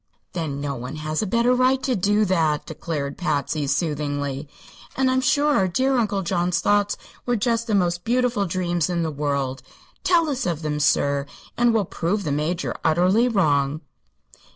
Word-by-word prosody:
"Then 155 Hz, -6 st, -3 dB
no 140 Hz, -1 st, -2 dB
one 125 Hz, +3 st, -6 dB
has 155 Hz, 0 st, -2 dB
a 215 Hz, -, -2 dB
better 235 Hz, +4 st, +3 dB
right 255 Hz, +1 st, +2 dB
to 255 Hz, -, +1 dB
do 205 Hz, +2 st, +2 dB
that," 160 Hz, -6 st, +1 dB
declared 150 Hz, -3 st, -4 dB
Patsy, 145 Hz, -3 st, -1 dB
soothingly; 145 Hz, -1 st, -2 dB, 0.5 s
"and 260 Hz, -1 st, +3 dB
I'm 260 Hz, 0 st, +2 dB
sure 290 Hz, +2 st, +2 dB
our 190 Hz, -, +3 dB
dear 260 Hz, +9 st, +1 dB
Uncle 205 Hz, -5 st, 0 dB
John's 175 Hz, 0 st, 0 dB
thoughts 205 Hz, 0 st, +2 dB, 0.3 s
were 245 Hz, -, +2 dB
just 230 Hz, +1 st, 0 dB
the 215 Hz, -, +1 dB
most 175 Hz, -2 st, +1 dB
beautiful 240 Hz, -4 st, +1 dB
dreams 175 Hz, -1 st, -1 dB
in 170 Hz, -1 st, 0 dB
the 160 Hz, -, -2 dB
world. 140 Hz, -3 st, -2 dB, 0.4 s
Tell 340 Hz, -3 st, +3 dB
us 270 Hz, -8 st, -2 dB
of 165 Hz, -2 st, -2 dB
them, 150 Hz, -1 st, -2 dB
sir, 140 Hz, -1 st, +2 dB, 0.3 s
and 240 Hz, 0 st, +3 dB
we'll 220 Hz, -3 st, +1 dB
prove 185 Hz, +5 st, -2 dB
the 150 Hz, -, -2 dB
Major 155 Hz, +5 st, -1 dB
utterly 180 Hz, +9 st, +3 dB
wrong." 150 Hz, -, +1 dB
175 Hz, 175 wpm, -23 LUFS, 150-225 Hz, 0.5 s, better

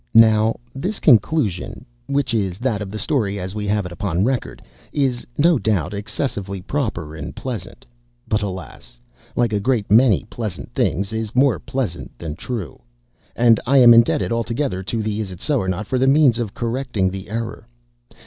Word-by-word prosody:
Now, 110 Hz, 0 st, +6 dB, 0.2 s
this 185 Hz, +10 st, -3 dB
conclusion 115 Hz, -, +2 dB, 0.2 s
(which 140 Hz, -3 st, 0 dB
is 95 Hz, -5 st, 0 dB
that 115 Hz, -3 st, -1 dB
of 100 Hz, -, -5 dB
the 105 Hz, -, -6 dB
story 105 Hz, -7 st, -1 dB
as 95 Hz, 0 st, -5 dB
we 105 Hz, -1 st, -4 dB
have 105 Hz, -1 st, 0 dB
it 90 Hz, -, -6 dB
upon 95 Hz, -1 st, -1 dB
record) 125 Hz, +1 st, -1 dB, 0.3 s
is, 130 Hz, -4 st, -1 dB
no 160 Hz, -1 st, +4 dB
doubt, 100 Hz, -7 st, 0 dB
excessively 100 Hz, -2 st, -3 dB
proper 90 Hz, -, -3 dB
and 75 Hz, -2 st, -7 dB
pleasant—but -, -, -6 dB
alas! 85 Hz, -11 st, -7 dB, 0.4 s
like 120 Hz, -3 st, +1 dB
a 105 Hz, -, +1 dB
great 110 Hz, -2 st, 0 dB
many 115 Hz, -2 st, +5 dB
pleasant 110 Hz, -4 st, -6 dB
things, 100 Hz, +4 st, 0 dB
is 110 Hz, 0 st, -4 dB
more 130 Hz, -3 st, +3 dB
pleasant 110 Hz, -, -4 dB
than 75 Hz, +1 st, -6 dB
true, 110 Hz, -, -6 dB, 0.5 s
and 115 Hz, -2 st, +5 dB
I 140 Hz, +2 st, +4 dB
am 120 Hz, -2 st, +9 dB
indebted 115 Hz, 0 st, +4 dB
altogether 115 Hz, -2 st, -1 dB
to 110 Hz, +4 st, -3 dB
the 105 Hz, 0 st, -2 dB
"Isitsöornot" 95 Hz, -, -1 dB
for 130 Hz, +4 st, -1 dB
the 130 Hz, -, +3 dB
means 135 Hz, -4 st, +5 dB
of 110 Hz, -4 st, -3 dB
correcting 120 Hz, -5 st, -1 dB
the 95 Hz, +1 st, -7 dB
error. 115 Hz, +1 st, -5 dB
110 Hz, 160 wpm, -21 LUFS, 95-125 Hz, 0.5 s, am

